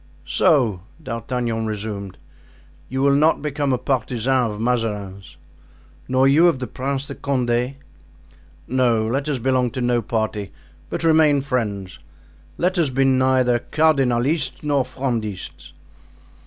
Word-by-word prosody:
"So," 125 - +2 0.2
D'Artagnan 115 -2 -3
resumed, 105 -3 -5 0.7
"you 130 +1 -1
will 140 0 +4
not 150 +1 +3
become 145 -1 -1
a 130 - +2
partisan 125 -1 0
of 105 0 -6
Mazarin's?" 105 -5 -3 0.7
"Nor 130 +1 +3
you 155 +6 +5
of 170 - +2
the 130 - -4
Prince 135 +2 -3
de - - -7
Condé?" 125 -1 -1 0.9
"No, 120 -3 +2
let 135 +6 -1
us 145 - 0
belong 125 0 +1
to 125 - -6
no 120 -1 +1
party, 110 -2 -2 0.4
but - - -4
remain 155 -3 +4
friends; 105 - -3 0.6
let 180 +1 0
us 160 -4 +2
be 135 +1 +1
neither 130 -2 +3
Cardinalists 135 -1 +1
nor 145 -3 +1
Frondists." 120 -7 -4
130 Hz, 130 wpm, -21 LUFS, 115-140 Hz, 0.9 s, you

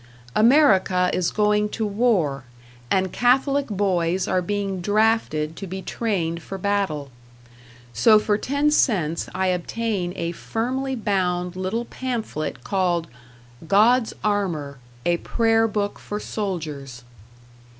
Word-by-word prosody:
America 215 -8 +4
is 180 -2 +1
going 210 0 +1
to 220 +1 -2
war, 200 - +1 0.5
and 190 -1 +1
Catholic 270 +3 +2
boys 185 -3 0
are 185 - +1
being 195 0 -2
drafted 205 -7 +1
to 195 - -6
be 190 +1 -6
trained 175 -7 -2
for 195 - -7
battle; 190 -8 -1 0.8
so 125 - +6
for 210 0 +1
ten 285 +7 0
cents 175 - +1
I 190 0 +1
obtain 185 +1 -2
a 170 - -2
firmly 260 +8 -3
bound 180 -5 -1
little 190 +6 -2
pamphlet 220 - -4
called 175 -4 0 0.6
"God's 225 +5 +4
Armor, 170 -10 -1 0.3
a 175 0 +2
Prayer 225 +3 +2
Book 205 -1 -2
for 210 - -5
Soldiers." 150 - -5
195 Hz, 120 wpm, -23 LUFS, 175-225 Hz, 0.8 s, so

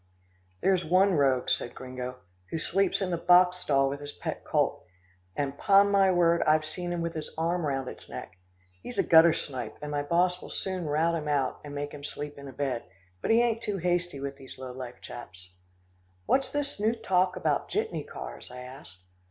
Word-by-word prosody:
"There's 185 -2 +3
one 185 +4 +4
rogue," 135 -5 +2
said - - -1
Gringo, 125 -1 -6 0.3
"who - - -2
sleeps 195 +5 +1
in 185 - -2
the 170 - -1
boxstall 180 -5 +4
with 140 +1 -3
his 145 0 -6
pet - - -5
colt, - - 0 0.5
and 140 -1 -2
'pon 200 +4 +5
my 195 -1 +5
word, 170 -2 +4
I've 155 0 +3
seen 175 +3 -4
him 175 -1 -2
with 170 0 -2
his 155 -1 -5
arm 165 0 0
round 135 -2 -1
its - - -9
neck. - - -8 0.5
He's 125 - -8
a - - +4
guttersnipe, 145 -8 +4
and 150 0 -6
my 145 0 0
boss 175 +4 +1
will - - -9
soon 185 -4 -3
rout 160 +3 +2
him 155 -2 -2
out 140 -3 0
and 145 -1 -8
make 145 0 -3
him 145 -1 -10
sleep 145 0 -6
in 140 - -9
a - - -7
bed, 130 -3 -2 0.4
but - - -3
he 230 +1 +5
ain't 230 -1 0
too 205 -3 -2
hasty 175 -3 0
with 140 0 -5
these 130 - -11
low 130 -1 -7
life 125 -1 -8
chaps." 95 -5 -10 0.7
"What's 265 - +2
this 290 -5 -2
new 220 +2 +2
talk 185 -5 +1
about - - 0
jitney - - -1
cars?" 65 0 -8
I 125 0 -9
asked. 95 -8 -12
155 Hz, 200 wpm, -28 LUFS, 135-180 Hz, 0.7 s, pon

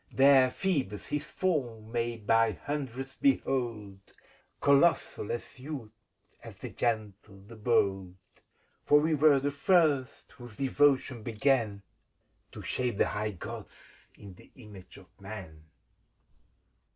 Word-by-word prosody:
There 135 -1 +6
Phoebus 130 - -2
his 150 0 -3
form 125 -13 -2
may 120 0 -2
by 115 +1 +2
hundreds 135 +1 -5
behold, 120 - -1 0.3
— - - -34
Colossal, 140 -6 +2
as 120 +3 -6
youth, 130 -5 -7 0.5
as - - -11
the - - -8
Gentle, 105 -4 -3
the 115 +3 -12
Bold; 100 -5 0 0.7
For 145 - +5
we 155 +2 +1
were 150 -1 +5
the 140 +2 -1
first 145 -3 +1
whose 120 -4 -13
devotion 135 -2 +2
began 110 -2 0 0.7
To - - -10
shape 125 -5 -2
the - - +2
high 105 0 -3
Gods 90 - -10
in 100 -2 -12
the - - -18
image 105 -7 -13
of - - -14 0.2
Man. 95 -7 -9
120 Hz, 125 wpm, -29 LUFS, 105-140 Hz, 0.7 s, There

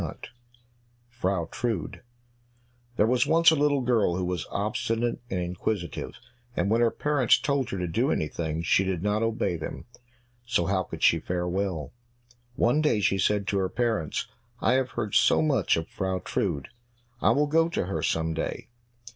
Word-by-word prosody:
43 - - -7 0.8
Frau 95 -8 -1
Trude 115 -9 -3 0.9
There 105 - +3
was 125 +2 +2
once 165 0 +6
a - - +3
little 145 -2 +2
girl 115 -8 +2
who 90 0 -1
was 90 -2 -3
obstinate 115 +3 -1
and 95 - -1
inquisitive, 90 0 -3 0.4
and 100 - 0
when 115 +1 +3
her 120 - +5
parents 145 -1 +2
told 140 -3 -1
her 95 - -3
to 90 - -2
do 80 - 0
anything, 80 +1 -2
she 95 - +3
did 95 -3 -2
not 105 +1 +1
obey 115 -6 0
them, 80 - -7 0.6
so 120 -8 0
how 95 0 +1
could - - -7
she 80 - +5
fare 90 +2 -2
well? 90 -4 -2 0.6
One 125 +7 +2
day 150 -8 +2
she 95 -1 +1
said 100 +2 +1
to 100 - +1
her 95 -1 0
parents, 110 -9 -1 0.3
"I - - +2
have 130 -1 +1
heard 105 - -4
so - - +5
much 150 - +2
of 80 - -3
Frau 95 -1 -2
Trude, 70 -5 -2 0.5
I - - +4
will 145 +1 +3
go 165 +3 +2
to 170 - -1
her 95 - -3
some 80 0 0
day. - - -4
100 Hz, 175 wpm, -27 LUFS, 90-120 Hz, 0.9 s, once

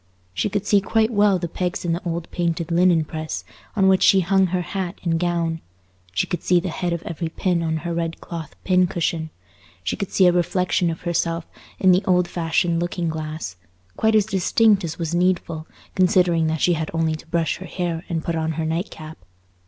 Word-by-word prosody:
She 205 - 0
could 205 +1 -2
see 205 -1 +4
quite 220 +3 +1
well 205 -3 +4
the 175 -1 -3
pegs 180 +2 -3
in 170 - +1
the 170 - -2
old 170 -1 -3
painted 170 -1 -1
linen 170 -2 +4
press 155 0 -5 0.3
on 195 -3 +4
which 190 -1 +4
she 195 - +6
hung 190 +1 +3
her 180 0 -1
hat 185 0 -4
and 165 -2 +1
gown; 170 -2 -1 0.5
she - - 0
could 175 - -3
see 180 -1 +3
the 180 +1 -3
head 175 +2 -2
of 170 -1 -3
every 165 0 -4
pin 175 +1 0
on 160 -1 0
her 170 - -1
red 165 -1 -2
cloth 165 -3 -7
pin 185 -1 +3
cushion; 165 -2 -2 0.5
she 95 - -1
could 200 - -4
see 190 - +4
a 180 - +7
reflection 180 0 +1
of 165 - -5
herself 170 -1 -1 0.3
in 185 - +5
the 180 +2 +4
old 180 -1 +3
fashioned 170 0 0
looking 175 -1 -2
glass, 155 - -5 0.4
quite 220 0 +2
as 210 -2 +4
distinct 205 +1 +3
as 160 -2 -4
was 165 -1 -3
needful, 175 -3 0 0.3
considering 175 -3 +3
that 160 -1 -1
she 175 - +4
had 160 -1 -2
only 165 -1 +1
to 155 +1 -8
brush 165 -1 0
her 185 - -8
hair 175 -2 -3
and 165 -2 -2
put 170 - -2
on 160 0 -1
her 160 +1 -2
night 165 +5 -1
cap. 155 0 -10
170 Hz, 210 wpm, -22 LUFS, 165-185 Hz, 0.5 s, a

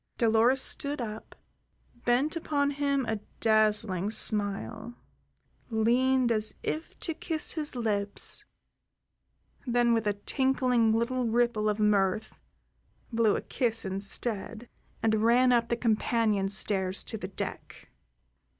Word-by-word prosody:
Dolores 235 +3 +3
stood 285 0 0
up, 220 -2 -7 0.7
bent 255 +6 +1
upon 285 -3 -1
him 280 -2 -1
a 220 -1 -2 0.2
dazzling 215 -3 +2
smile, 215 +2 -1 0.7
leaned 245 +3 +2
as 215 -1 -1
if 320 +1 -5
to 330 - -1
kiss 315 0 +1
his 300 -4 +1
lips, 205 -4 +1 1.2
then 240 -1 +2
with 225 -2 0
a 205 - +2
tinkling 255 -4 +1
little 240 +3 0
ripple 230 -2 +1
of 210 - -1
mirth 210 0 0 0.7
blew 225 -2 +2
a - - -2
kiss 230 -4 -2
instead 205 +4 -4 0.4
and 220 -1 +2
ran 245 +2 +4
up 235 -1 +2
the 235 - 0
companion 220 -3 0
stairs 190 -1 0
to - - -3
the 195 -4 -5
deck. 190 - -8
230 Hz, 120 wpm, -28 LUFS, 210-250 Hz, 1.2 s, ran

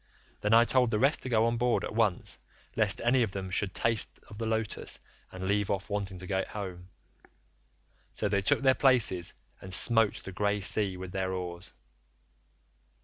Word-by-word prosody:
Then 105 - -1
I 115 - +7
told 125 -1 +3
the 110 - 0
rest 135 +7 +2
to 130 - -5
go 115 -2 +3
on 115 0 0
board 120 +1 +1
at - - -5
once, 110 -5 0 0.4
lest 105 -3 +1
any 125 +2 +3
of 110 -5 -1
them 95 -1 -5
should 95 +1 -1
taste 115 +3 0
of 105 0 -11
the 115 - -2
lotus 110 -2 -3 0.3
and 95 0 -6
leave 100 0 0
off 100 +1 -3
wanting 100 -2 -3
to 95 - -8
get 95 0 -2
home, 95 -3 -7 1.2
so 105 - -2
they 100 -1 +1
took 95 - +1
their 130 -1 +5
places 120 -11 +2 0.3
and 95 - -9
smote 115 +2 +4
the 95 - -7
grey 105 +2 -1
sea 100 -1 +2
with 90 0 -8
their 95 0 -2
oars. 90 0 -6
105 Hz, 185 wpm, -29 LUFS, 95-115 Hz, 1.2 s, I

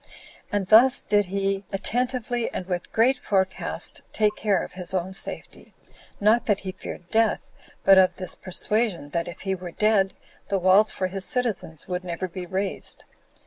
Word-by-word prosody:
And 205 -2 0
thus 250 +5 +7
did 205 0 +2
he 195 +1 -1
attentively, 245 +3 -1
and 180 - -4
with 180 -1 -4
great 250 +4 +3
forecast, 190 -2 -2
take 210 -1 +1
care 200 -4 +1
of - - -8
his 180 +1 -4
own 185 +1 -2
safety; 195 - -4 0.4
not 215 +3 +3
that 205 -2 +2
he 190 - -4
feared 180 -1 -9
death, 225 -1 +1 0.3
but 195 -1 +7
of 185 -1 +4
this 185 -1 -6
persuasion, 195 -4 0
that 170 +3 -2
if 175 - -9
he 195 -1 -1
were 180 -1 -6
dead, 200 +1 +2 0.3
the 200 - +1
walls 190 +4 +5
for 185 - -2
his 190 +1 -2
citizens 225 - -2
would 180 0 -3
never 180 +1 -4
be 180 0 -7
raised. 190 +2 -3
195 Hz, 170 wpm, -25 LUFS, 185-215 Hz, 0.4 s, thus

